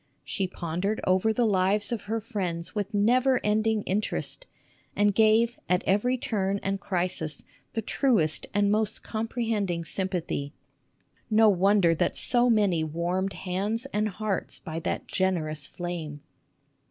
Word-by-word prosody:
She 195 - -2
pondered 180 +4 -2
over 185 +4 +3
the 235 +2 +1
lives 205 +1 +2
of 235 -3 -3
her 225 +2 -1
friends 180 -6 -3
with 205 -1 -2
never 245 +5 +3
ending 215 0 +1
interest, 210 - -3 0.5
and 205 0 +3
gave 225 +3 +3
at 180 0 +2
every 245 +7 +2
turn 200 -4 -1
and 195 0 -1
crisis 175 -6 -2 0.3
the 225 - -2
truest 205 - +1
and 205 0 +2
most 215 0 0
comprehending 220 -6 -2
sympathy. 170 -5 -2 0.8
No 220 0 +6
wonder 195 -2 +4
that 165 - 0
so 245 0 +4
many 200 -8 +3
warmed 175 +5 -1
hands 200 +6 -2
and 215 +1 +1
hearts 210 -1 -3
by 160 -1 -6
that - - -3
generous 155 -6 -1
flame 165 -5 -5
200 Hz, 135 wpm, -27 LUFS, 180-220 Hz, 0.8 s, No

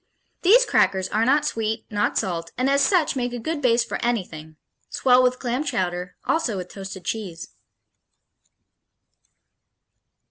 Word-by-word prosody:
These 470 +7 +6
crackers 190 - +2
are 215 +2 +1
not 290 +3 +3
sweet, 225 -5 -2
not 205 0 0
salt, 170 -3 -2
and 255 +1 +1
as 280 0 +3
such 325 0 +2
make 245 -2 -2
a - - -3
good 300 +6 -4
base 235 -2 +3
for - - -5
anything 170 -10 -3 0.3
swell 250 -1 +4
with 255 0 +2
clam 250 +3 -2
chowder, 180 -9 -3
also 265 -11 0
with 180 -1 -6
toasted 195 -2 -9
cheese.... 185 -7 -5
230 Hz, 140 wpm, -23 LUFS, 190-265 Hz, 0.3 s, These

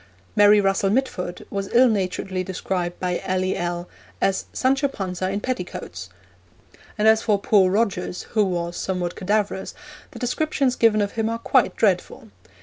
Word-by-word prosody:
Mary 205 0 +6
Russell 195 0 +2
Mitford 195 -7 -2
was 195 -1 -3
ill 255 +2 +6
naturedly 190 -3 -1
described 180 -1 -3
by 180 -1 -1
L.E.L. 180 -2 -1 0.3
as 195 -1 0
'Sancho 270 +2 +1
Panza 185 -6 -3
in 200 +1 -2
petticoats!'; 180 - -5 0.9
and 210 - +2
as 220 0 +5
for 210 -2 +2
poor 200 -1 +3
Rogers, 190 -3 -1
who 215 -2 +3
was 175 -2 -2
somewhat 180 -2 -2
cadaverous, 200 0 -1 0.3
the - - -12
descriptions 270 0 0
given 215 -2 +3
of 200 - -3
him 225 -1 -1
are 230 - -2
quite - - +2
dreadful. - - 0
195 Hz, 145 wpm, -23 LUFS, 180-220 Hz, 0.9 s, Mary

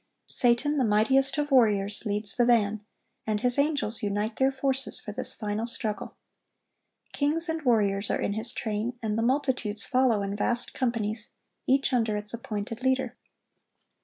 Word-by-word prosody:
Satan, 250 +5 +2
the - - +3
mightiest 265 +6 +3
of 295 -1 -1
warriors, 210 -4 +3
leads 205 0 0
the 245 - +3
van, 215 -3 +2 0.4
and 210 -1 -1
his 250 +2 +1
angels 285 -7 +1
unite 210 +2 -2
their 265 0 +3
forces 270 0 -2
for - - -7
this - - -4
final 215 +1 -3
struggle. 220 -3 -4 1.0
Kings 310 +4 +3
and 320 0 -2
warriors 205 -6 +2
are - - 0
in 200 - -1
his 220 +3 -1
train, 220 +2 -3
and 215 -1 -1
the 225 - 0
multitudes 245 -4 0
follow 250 -6 +2
in 200 0 -3
vast 235 +3 -1
companies, 225 -4 -2 0.3
each 270 0 +2
under 225 -4 +1
its 210 +1 -6
appointed 225 0 -5
leader. 260 0 0
230 Hz, 160 wpm, -27 LUFS, 210-265 Hz, 1.0 s, the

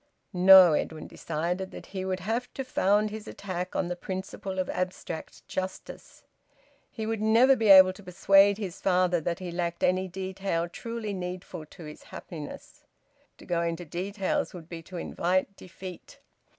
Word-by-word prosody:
No, 185 -2 +8
Edwin 155 +1 -2
decided 180 +4 -3
that - - -10
he 190 -1 -5
would 185 0 -2
have 230 +6 -2
to 270 - -3
found 210 -4 +2
his 220 0 -7
attack 185 -2 -5
on 185 - 0
the 180 - -3
principle 190 +1 -6
of 185 -1 -1
abstract 180 -3 -5
justice; 185 0 -6 0.7
he 220 - -5
would 220 -1 -2
never 230 +5 +5
be 225 -3 0
able 190 -1 +9
to 195 - -14
persuade 195 +2 +4
his 195 -5 -6
father 180 -2 +2
that 170 +2 -2
he 185 -2 -6
lacked 170 0 -3
any 185 +1 +2
detail 190 -2 -3
truly 230 +3 -5
needful 180 -3 -6
to 170 - -13
his 150 -1 -10
happiness. 155 -5 -9 0.5
To - - -14
go 170 -1 0
into 170 +1 -3
details 190 +4 -2
would 165 -3 -10
be 170 -1 -7
to 180 +2 -9
invite 185 +3 -1
defeat. 185 -1 -11
185 Hz, 165 wpm, -28 LUFS, 175-195 Hz, 0.7 s, able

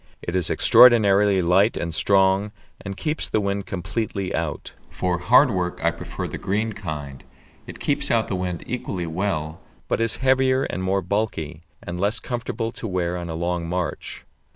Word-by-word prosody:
It 85 - -4
is 90 -3 +1
extraordinarily 105 -5 +5
light 95 +6 +3
and 85 -1 -3
strong, 95 +3 +2 0.3
and 100 -1 -6
keeps 150 +9 -2
the - - +1
wind 100 -1 -2
completely 95 +1 -3
out. 80 -2 -3 0.2
For 90 -1 -2
hard 120 +8 +5
work 90 -3 -2
I 85 - +3
prefer 85 - -6
the - - -6
green 105 +3 -1
kind. 75 -8 -7 0.4
It - - -9
keeps - - -1
out - - +2
the - - -3
wind 90 -2 -3
equally 95 -8 -4
well, 80 -2 -3 0.3
but - - 0
is 115 -1 +1
heavier 130 0 +2
and 90 - -3
more 95 +1 0
bulky, 85 -5 -2 0.2
and 90 0 -5
less 100 +4 +2
comfortable 120 -2 -4
to 115 - -6
wear 90 -2 -1
on 85 -1 -5
a 80 - -4
long 85 0 -2
march. 90 -3 -4
95 Hz, 175 wpm, -23 LUFS, 85-105 Hz, 0.4 s, extraordinarily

